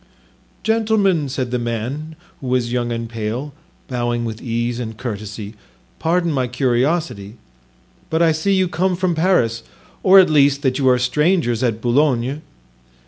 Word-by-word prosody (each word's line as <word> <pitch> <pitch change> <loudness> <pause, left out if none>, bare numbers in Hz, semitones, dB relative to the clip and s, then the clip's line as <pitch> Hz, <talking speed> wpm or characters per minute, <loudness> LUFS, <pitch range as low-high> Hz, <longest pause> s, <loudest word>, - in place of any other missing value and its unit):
"Gentlemen," 210 -9 +2
said 130 -2 -3
the 125 - 0
man, 120 +7 -4 0.2
who 135 - -7
was 125 -2 0
young 120 -1 -1
and 115 0 -3
pale, 115 +5 -4 0.3
bowing 120 -2 -1
with 110 -1 -5
ease 120 0 -2
and 110 -3 -5
courtesy, 105 -3 -6 0.5
"pardon 170 +1 +1
my 130 -4 0
curiosity, 125 - -1 0.7
but 160 - 0
I 165 -1 +4
see 175 +6 +1
you 190 -1 +2
come 180 +2 0
from 185 0 0
Paris, 160 -10 +1 0.4
or 190 +1 +6
at 185 - +6
least 140 -1 +3
that 130 0 +1
you 130 -2 +3
are 125 - +4
strangers 140 -1 +1
at 115 -3 0
Boulogne." 130 +2 +1
130 Hz, 150 wpm, -19 LUFS, 120-160 Hz, 0.7 s, or